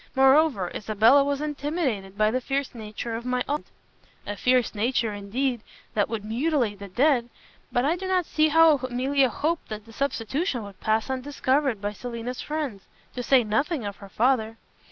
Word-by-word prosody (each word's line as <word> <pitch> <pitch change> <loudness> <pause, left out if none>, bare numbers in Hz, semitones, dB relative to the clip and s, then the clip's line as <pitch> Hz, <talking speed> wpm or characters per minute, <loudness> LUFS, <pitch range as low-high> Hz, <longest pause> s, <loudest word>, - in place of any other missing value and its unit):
Moreover, 265 - +4
Isabella 220 +6 +4
was 280 0 -1
intimidated 285 - -2
by 215 0 +3
the 255 +2 -1
fierce 275 +2 -2
nature 225 0 -5
of 230 - -5
my 250 0 0
aunt." 295 +1 -2 0.6
"A 205 - -4
fierce 250 +2 +2
nature, 225 0 0
indeed, 235 +5 -2 0.3
that 205 0 +1
would 215 -2 -4
mutilate 235 -2 0
the 200 - -7
dead. 245 +3 +2 0.4
But 245 +2 +1
I 315 +4 +2
do 380 +1 -5
not 370 -2 +1
see 310 0 +2
how 320 -1 +6
Emilia 260 +1 +1
hoped 315 +7 -2
that 215 -1 -6
the 225 - -14
substitution 270 - -1
would 200 -2 -11
pass 220 0 +1
undiscovered 265 -2 0
by 205 0 -2
Selina's 240 +2 -5
friends, 295 -10 -4 0.3
to 250 - -4
say 250 +1 +4
nothing 235 +5 -1
of 200 -1 -5
her 200 - -12
father." 225 0 +1
250 Hz, 175 wpm, -25 LUFS, 215-280 Hz, 0.6 s, how